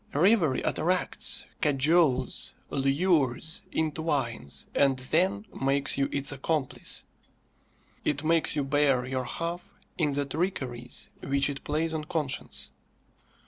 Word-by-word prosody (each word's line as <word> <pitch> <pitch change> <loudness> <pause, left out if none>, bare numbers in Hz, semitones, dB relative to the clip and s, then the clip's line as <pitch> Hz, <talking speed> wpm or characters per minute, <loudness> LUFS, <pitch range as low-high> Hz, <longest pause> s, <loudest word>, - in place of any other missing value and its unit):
Reverie 165 - +4
attracts, 180 +3 0 0.2
cajoles, 145 -2 +2 0.2
lures, 140 +1 +1
entwines, 145 - -1
and 135 -2 +3
then 185 +10 +1 0.2
makes 135 +1 +2
you 135 0 +1
its 140 0 +1
accomplice. 145 0 -2 1.0
It 145 0 0
makes 160 -1 +2
you 145 - +1
bear 135 -2 +2
your 130 0 -2
half 170 +6 -5 0.2
in 150 -3 +2
the 145 0 0
trickeries 130 -6 -3
which 140 +1 +2
it 140 - -8
plays 160 +2 -1
on 155 -1 -3
conscience. 150 -4 -2
145 Hz, 110 wpm, -28 LUFS, 135-160 Hz, 1.0 s, Reverie